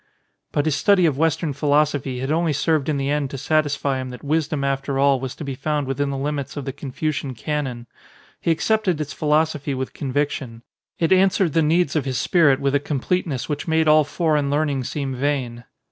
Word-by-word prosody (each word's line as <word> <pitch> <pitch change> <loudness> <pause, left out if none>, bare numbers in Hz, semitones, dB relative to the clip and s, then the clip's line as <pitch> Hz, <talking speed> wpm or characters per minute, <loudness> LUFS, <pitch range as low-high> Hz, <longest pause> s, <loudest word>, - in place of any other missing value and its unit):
But 145 - 0
his 155 - +2
study 195 +1 +4
of 145 -4 +1
Western 160 -1 +1
philosophy 145 -2 +1
had 135 +2 -2
only 165 0 +1
served 155 0 +1
in 150 - 0
the 140 0 -1
end 145 -2 0
to 135 - -6
satisfy 145 -1 0
him 130 - -6
that 125 - -10
wisdom 155 0 0
after 135 0 -1
all 140 -1 +3
was 130 0 -5
to - - -7
be 140 -2 -4
found 145 +2 -2
within 135 +2 -1
the 135 - -3
limits 140 0 -3
of 140 - -4
the 135 - -4
Con 140 0 -8
fucian 140 -2 -2
canon. 135 -6 -3 0.5
He - - -2
accepted 185 +1 +1
its 150 -1 -4
philosophy 150 -2 0
with 130 0 -4
conviction. 135 -4 -3 0.3
It 165 +2 +3
answered 190 -3 +3
the 165 - +3
needs 160 0 +2
of 150 -4 0
his 130 -2 -2
spirit 150 -5 +3
with 140 0 0
a 145 - +3
completeness 145 0 -2
which 150 +1 -4
made 160 -1 +2
all 155 0 +6
foreign 150 -1 0
learn 145 +1 +1
ing 135 -2 -2
seem 135 +1 -3
vain. 125 -3 -2
145 Hz, 205 wpm, -22 LUFS, 135-155 Hz, 0.5 s, all